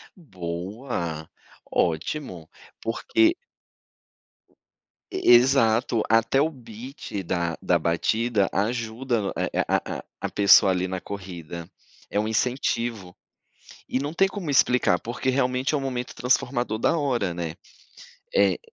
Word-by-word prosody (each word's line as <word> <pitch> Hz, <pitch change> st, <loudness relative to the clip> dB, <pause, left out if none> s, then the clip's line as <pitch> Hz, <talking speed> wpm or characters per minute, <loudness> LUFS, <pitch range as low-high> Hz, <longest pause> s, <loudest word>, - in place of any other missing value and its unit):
Boa, 90 Hz, -, -5 dB, 0.4 s
ótimo! 85 Hz, -, -2 dB, 0.3 s
Porque 330 Hz, -, +2 dB, 1.8 s
E 375 Hz, -, +2 dB
exato, 120 Hz, -2 st, +4 dB
até 115 Hz, +4 st, +3 dB
o 155 Hz, +3 st, +3 dB
beat 120 Hz, -4 st, -8 dB
da 85 Hz, -1 st, -1 dB
da -, -, +2 dB
batida 105 Hz, +5 st, +1 dB
ajuda 115 Hz, 0 st, -1 dB
a -, -, -1 dB
eh, -, -, 0 dB
a -, -, +3 dB
a -, -, -5 dB
a -, -, -10 dB, 0.2 s
a -, -, -2 dB
pessoa, 100 Hz, -1 st, +6 dB
ali, 90 Hz, 0 st, 0 dB
na 95 Hz, 0 st, -3 dB
corrida. 85 Hz, -4 st, -7 dB, 0.4 s
É 105 Hz, -, +1 dB
um 105 Hz, -, 0 dB
incentivo. 115 Hz, -4 st, -1 dB, 0.7 s
E 130 Hz, -, 0 dB
não 145 Hz, +3 st, -3 dB
tem 195 Hz, +3 st, +3 dB
como 190 Hz, -6 st, -5 dB
explicar, 125 Hz, -9 st, +3 dB
porque, 125 Hz, +3 st, -2 dB
realmente, 130 Hz, +1 st, 0 dB
é -, -, +4 dB
um -, -, -1 dB
momento 125 Hz, -2 st, -4 dB
transformador 125 Hz, -2 st, 0 dB
da 140 Hz, -, +2 dB
hora, 120 Hz, -, 0 dB
né. 85 Hz, -2 st, -4 dB, 0.8 s
Eh, -, -, +4 dB
115 Hz, 130 wpm, -25 LUFS, 95-130 Hz, 1.8 s, pessoa